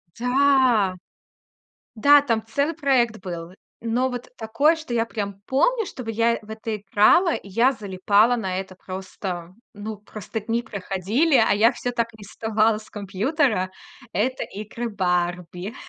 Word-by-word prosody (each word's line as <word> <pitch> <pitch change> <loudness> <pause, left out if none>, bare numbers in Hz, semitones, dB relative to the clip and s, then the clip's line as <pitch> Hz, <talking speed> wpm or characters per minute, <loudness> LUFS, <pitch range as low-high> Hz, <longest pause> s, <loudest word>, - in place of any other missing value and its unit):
Да, 250 -6 +3 1.0
да, 285 +6 +6
там 230 -6 0
целый 280 +8 0
проект 255 - +2
был. 175 -1 -6 0.3
Но 240 +3 0
вот 245 -1 -6
такое, 235 +8 +2
что 315 -7 -7
я 230 0 +2
прям 200 -3 -5
помню, 450 - +2
чтобы 240 -8 -6
я 230 +1 +1
в 215 - -17
это 220 0 -4
играла, 210 - +4
и - - -8
я 230 +7 +3
залипала 205 +3 +2
на 190 -5 -2
это. 190 -1 -8
Просто, 185 -1 -6 0.2
ну, 210 +1 -6
просто 210 +1 -7
дни 230 +2 -1
проходили, 210 - 0
а 220 - +4
я 225 +3 +5
всё 245 - -4
так 235 -1 0
и - - -16
не 205 - -12
вставала 220 +1 +1
с 215 - -16
компьютера. 210 - 0 0.4
Это 250 +8 0
игры 215 +3 -6
"Барби". 180 0 -2
220 Hz, 150 wpm, -23 LUFS, 195-245 Hz, 1.0 s, да